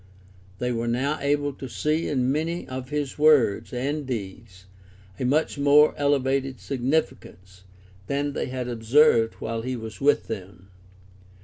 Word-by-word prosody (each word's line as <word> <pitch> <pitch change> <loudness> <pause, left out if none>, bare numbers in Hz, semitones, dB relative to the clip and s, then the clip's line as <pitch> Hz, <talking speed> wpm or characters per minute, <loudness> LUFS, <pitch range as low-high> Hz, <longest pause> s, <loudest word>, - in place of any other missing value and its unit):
They 125 +3 -2
were 120 0 -2
now 130 +6 0
able 145 0 0
to 130 -1 -8
see 155 +6 -1
in 130 -3 0
many 165 +4 -2
of 130 0 -6
his 145 -2 -3
words 150 -9 +4
and 140 +5 -2
deeds 100 -4 -7 0.5
a - - -1
much 145 +2 +1
more 145 +2 +5
elevated 135 -2 0
significance 120 - -3 0.4
than 140 +1 -1
they - - -3
had 125 -1 -4
observed 115 0 +3
while 115 0 -4
he 130 +2 -3
was 110 0 -8
with 145 +1 +3
them. 95 -2 -8
130 Hz, 140 wpm, -25 LUFS, 115-145 Hz, 0.5 s, more